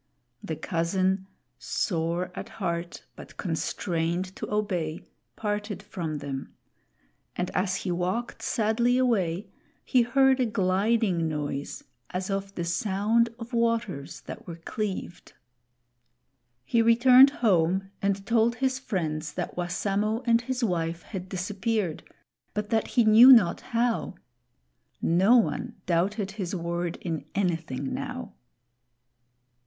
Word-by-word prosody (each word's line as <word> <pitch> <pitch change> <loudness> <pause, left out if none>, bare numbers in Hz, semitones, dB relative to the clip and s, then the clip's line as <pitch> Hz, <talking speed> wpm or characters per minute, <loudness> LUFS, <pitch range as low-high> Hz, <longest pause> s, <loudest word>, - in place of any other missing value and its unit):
The 160 - -4
cousin, 185 +4 0 0.3
sore 170 - -1
at 220 - -7
heart 170 -3 -3
but - - -12
constrained 175 +1 -2
to - - -6
obey, 180 -7 -1 0.3
parted 205 -1 -3
from 165 -7 -4
them; 140 -2 -6 0.8
and 180 0 -2
as 185 0 0
he 180 - 0
walked 185 +8 -2
sadly 235 +2 +1
away, 200 -6 0 0.3
he 255 - +4
heard 265 +2 +3
a 250 - +2
gliding 195 -3 +1
noise 145 -2 -4 0.3
as 185 +2 -3
of 195 0 -3
the 170 - -2
sound 210 +5 +1
of 235 +1 -9
waters 230 -11 -1
that - - -9
were 170 - -6
cleaved. 190 +2 -5 1.3
He 230 - +2
returned 250 +4 +7 0.2
home 190 0 +2
and 195 0 0
told 230 +2 +3
his 260 +1 0
friends 160 - -3
that 180 - -4
Wassamo 200 +6 -1
and 230 -1 +4
his 250 +1 -3
wife 170 -4 -1
had 190 -3 -7
disappeared, 195 -1 -2 0.5
but 210 +1 -3
that 225 -1 +1
he 240 - +7
knew 225 +4 +9
not 225 -9 +6
how. 230 -4 -1 0.8
No 190 +9 +4
one 235 0 0
doubted 195 +4 0
his 195 -3 -4
word 170 0 -2
in 160 -5 -4
anything 165 -8 -1
now. - - -5
195 Hz, 120 wpm, -27 LUFS, 170-230 Hz, 1.3 s, knew